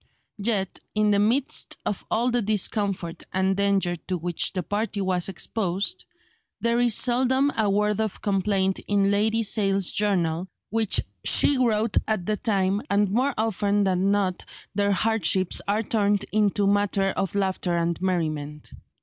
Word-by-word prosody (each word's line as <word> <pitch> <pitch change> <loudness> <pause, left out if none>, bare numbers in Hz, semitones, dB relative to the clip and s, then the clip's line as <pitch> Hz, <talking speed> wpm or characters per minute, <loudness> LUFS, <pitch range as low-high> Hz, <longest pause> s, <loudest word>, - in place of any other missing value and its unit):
Yet, 200 -3 -1 0.2
in 210 0 +3
the 200 - +3
midst 240 +7 0
of 205 - -3
all 240 +3 +1
the 245 0 +1
discomfort 200 -4 -1
and 190 +1 +1
danger 195 -3 +1
to 185 - -1
which 175 0 -1
the 185 -2 -3
party 210 +3 -2
was 185 -2 0
exposed, 195 - -2 0.5
there 235 0 +1
is 240 -3 +3
seldom 260 +3 +2
a 215 -2 +1
word 210 +1 +1
of 220 -3 -3
complaint 195 -1 0
in 200 -1 +2
Lady 220 +3 +1
Sale's 195 -3 +1
journal 180 -4 0 0.2
which 220 -2 +2 0.2
she 280 -2 +3
wrote 225 -3 +1
at 215 -5 -1
the 215 - 0
time, 195 -2 0
and 200 -1 +2
more 255 +5 +1
often 205 -2 +1
than 190 0 +1
not 200 -3 0 0.3
their 200 0 +1
hardships 200 -2 +1
are 210 +2 +1
turned 205 -2 +1
into 205 -1 +2
matter 200 -1 +1
of 195 0 -3
laughter 190 -3 0
and 170 0 -1
merriment. 155 -5 -2
200 Hz, 150 wpm, -25 LUFS, 190-215 Hz, 0.5 s, in